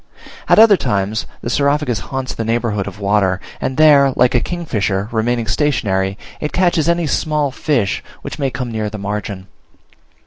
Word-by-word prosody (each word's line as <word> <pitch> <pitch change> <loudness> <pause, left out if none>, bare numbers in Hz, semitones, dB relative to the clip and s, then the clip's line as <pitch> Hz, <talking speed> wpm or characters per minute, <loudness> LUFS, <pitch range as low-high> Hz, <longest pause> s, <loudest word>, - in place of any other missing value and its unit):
At - - +6
other 215 -2 +7
times 105 - -1
the - - -4
Saurophagus 140 -2 +1
haunts 130 -1 -3
the 115 - -4
neighbourhood 115 -3 -1
of 100 0 -8
water, 100 -2 +1 0.2
and 130 - -2
there, 145 -3 +6
like 125 - +3
a 120 - +4
kingfisher, 105 - -2
remaining 115 +1 0
stationary, 105 -7 0 0.2
it 150 - -4
catches 175 -3 +2
any 170 0 +1
small 150 -1 0
fish 125 -8 -1 0.2
which - - -7
may 135 -2 0
come 125 -2 -5
near 110 -1 -2
the 105 - -7
margin. 100 -1 -4
120 Hz, 165 wpm, -17 LUFS, 105-150 Hz, 0.2 s, other